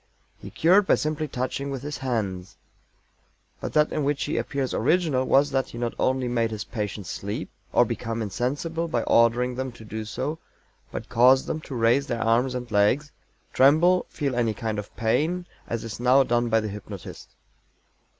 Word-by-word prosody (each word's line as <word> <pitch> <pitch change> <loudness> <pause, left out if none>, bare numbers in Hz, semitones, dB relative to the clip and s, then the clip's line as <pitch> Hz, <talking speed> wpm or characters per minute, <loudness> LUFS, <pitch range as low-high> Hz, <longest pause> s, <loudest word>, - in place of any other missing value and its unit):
He - - -9
cured 190 +4 +4
by - - +5
simply 155 0 -2
touching 130 +1 -3
with 135 -2 -5
his 145 0 -5
hands. 105 -8 -3 1.0
But - - -5
that 150 0 +3
in 150 - -1
which 145 0 0
he 150 - -2
appears 140 -3 -2
original 140 0 +2
was 140 +2 +3
that 135 -1 0
he - - -9
not 120 -1 -2
only 130 -1 +1
made 115 -2 +1
his 110 -2 -4
patients 105 -4 -5
sleep 100 +1 -5 0.2
or - - +4
become 115 0 -4
insensible 145 - -2
by 120 -8 -1
ordering 120 +2 +3
them 130 +1 -4
to 110 - -13
do 110 +1 -5
so 130 +8 -4 0.5
but - - -6
caused 130 +3 +5
them 155 - -3
to 140 - -8
raise 120 +4 +2
their 120 -4 -2
arms 120 +3 +2
and 125 -2 -5
legs, 115 +8 +2 0.4
tremble, 160 +7 +4
feel 140 -5 -2
any 115 -3 +1
kind 110 -1 -3
of 105 - -7
pain, 160 +11 0 0.2
as 115 - -3
is 115 -1 -6
now 130 +3 +5
done 120 -1 +1
by 115 0 +3
the 110 - -3
hypnotist. 100 -1 -9
125 Hz, 180 wpm, -25 LUFS, 115-140 Hz, 1.0 s, by